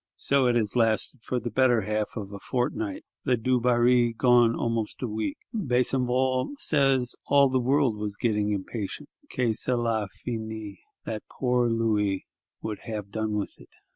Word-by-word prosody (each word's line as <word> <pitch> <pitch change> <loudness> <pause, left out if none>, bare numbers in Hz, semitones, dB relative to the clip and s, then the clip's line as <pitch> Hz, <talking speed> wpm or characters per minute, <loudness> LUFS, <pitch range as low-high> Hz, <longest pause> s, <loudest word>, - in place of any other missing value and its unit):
So 135 -2 +2
it 120 - +2
has 110 -2 0
lasted 115 +2 +1
for 125 +2 -2
the 120 -1 -5
better 125 -1 +3
half 105 +3 -2
of 100 -2 -6
a 100 - -7
fortnight; 290 - -2 0.2
the 125 -3 +2
Dubarry 120 0 +3
gone 120 -1 +4
almost 115 0 -2
a - - 0
week. 110 +5 -3 0.2
Besenval 130 - +1
says, 135 - +2
all 140 -1 +5
the 130 0 +2
world 130 -2 +2
was 105 -1 -4
getting 105 -2 +1
impatient 105 +7 -4 0.2
que 120 -3 0
cela 115 -3 0 0.2
finît; 110 -4 -5 0.3
that 110 -1 -4
poor 125 -2 +1
Louis 105 -4 +1 0.4
would 105 -2 -4
have 105 -3 -5
done 110 0 -2
with 105 -1 -2
it. - - -16
120 Hz, 155 wpm, -27 LUFS, 110-130 Hz, 0.4 s, all